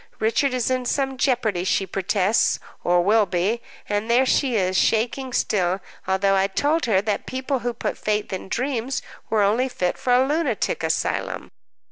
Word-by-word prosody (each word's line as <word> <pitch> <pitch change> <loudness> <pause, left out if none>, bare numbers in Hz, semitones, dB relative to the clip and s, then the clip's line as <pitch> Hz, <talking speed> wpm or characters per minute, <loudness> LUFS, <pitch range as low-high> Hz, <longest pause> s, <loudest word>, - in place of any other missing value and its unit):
Richard 230 +5 +1
is 250 0 0
in 255 -1 0
some 270 +1 0
jeopardy, 235 -8 0
she 195 +1 +1
protests, 195 +2 +1 0.3
or 175 0 +3
will 210 +2 +3
be. 190 +7 0 0.3
And 205 +2 -2
there 245 +3 +4
she 260 -1 +1
is, 185 -2 +1
shaking 240 +6 +1
still, 190 -5 0 0.3
although 190 +1 +2
I 195 0 +3
told 295 +11 0
her 195 -4 +3
that 210 -1 -2
people 260 +1 -2
who 245 +1 -2
put - - -4
faith 210 -1 -1
in 190 0 -5
dreams 255 +1 -2 0.3
were 215 -2 +2
only 230 +6 +2
fit 180 -7 -2
for 250 - -1
a 250 +1 +5
lunatic 290 -6 0
asylum." - - -2
225 Hz, 170 wpm, -23 LUFS, 195-255 Hz, 0.3 s, a